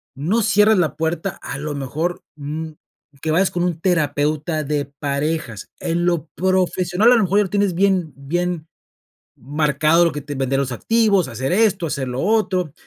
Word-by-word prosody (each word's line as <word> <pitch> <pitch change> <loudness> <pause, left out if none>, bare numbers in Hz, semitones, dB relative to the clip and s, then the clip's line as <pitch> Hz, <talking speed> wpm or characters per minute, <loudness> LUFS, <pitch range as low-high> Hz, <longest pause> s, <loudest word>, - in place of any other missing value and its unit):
no 180 - 0
cierres 210 +2 +4
la 170 -4 +1
puerta, 165 +3 -2
a - - -5
lo 150 +1 -4
mejor, 150 +6 -3
mm, 155 +2 -5 0.5
que 160 - -1
vayas 185 +4 +3
con 175 - -1
un 175 -3 -1
terapeuta 155 -2 0
de 145 -1 -1
parejas. 140 - -2
En 170 +1 -1
lo 170 -3 0
profesional, 185 +3 +2
a - - +7
lo 225 - +3
mejor 195 +3 +2
ya - - +4
lo - - -6
tienes 200 -2 +1
bien 185 -3 +1
bien 165 +3 -3 0.7
marcado, 150 +4 +2
lo 170 - +1
que 150 - -5
te 145 +1 -7
vender 135 0 0
los 135 -2 -2
activos, 210 - +2
hacer 130 +6 -3
esto, 200 -3 +2
hacer 140 -3 -3
lo 125 +2 -3
otro, 190 -7 +1
165 Hz, 175 wpm, -20 LUFS, 145-185 Hz, 0.7 s, a